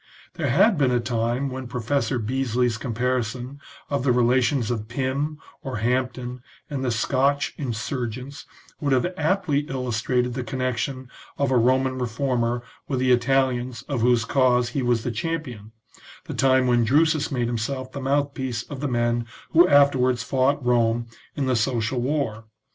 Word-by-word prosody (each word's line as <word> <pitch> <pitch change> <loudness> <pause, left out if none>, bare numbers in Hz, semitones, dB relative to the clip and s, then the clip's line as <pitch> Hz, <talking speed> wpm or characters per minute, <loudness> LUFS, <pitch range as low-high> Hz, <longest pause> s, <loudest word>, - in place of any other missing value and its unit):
There - - -2
had 215 -8 +4
been 135 -3 +3
a 125 -1 +2
time 120 +2 -1
when 130 0 -5
Professor 125 +2 -1
Beesly's 120 0 0
comparison 125 +2 -2 0.3
of 140 -3 -1
the 130 - +3
relations 125 0 +2
of 110 -3 -3
Pym, 135 +5 -2 0.2
or 130 -4 -4
Hampden, 125 +2 -1 0.3
and 135 -2 -2
the 130 - 0
Scotch 135 +4 +1
insurgents 125 +1 -4 0.3
would 140 -2 +1
have 130 +8 +1
aptly 160 -2 +1
illustrated 125 -1 -1
the 130 0 -3
connection 130 +1 -3 0.3
of 140 -2 +1
a 130 - +4
Roman 130 +2 +2
reformer 120 0 -1 0.2
with 135 - -1
the 130 0 +2
Italians 125 0 +1
of 135 -5 -3
whose 120 -1 +3
cause 125 -2 +2
he 135 +3 -2
was 120 -2 +1
the 120 - -2
champion, 120 -5 -4 0.5
the - - -6
time 130 -1 +3
when 120 -1 +3
Drusus 155 +5 +2
made 125 -3 0
himself 130 +3 -3
the 140 - -6
mouthpiece 135 -3 -1
of 145 - -8
the 145 - -1
men 120 -1 0 0.2
who 170 +2 +6
afterwards 130 -5 +4
fought 135 +2 +1
Rome 120 -1 +2 0.3
in 140 - -1
the 130 -1 +1
social 120 +1 0
war. 125 -5 -2
125 Hz, 155 wpm, -24 LUFS, 120-135 Hz, 0.5 s, who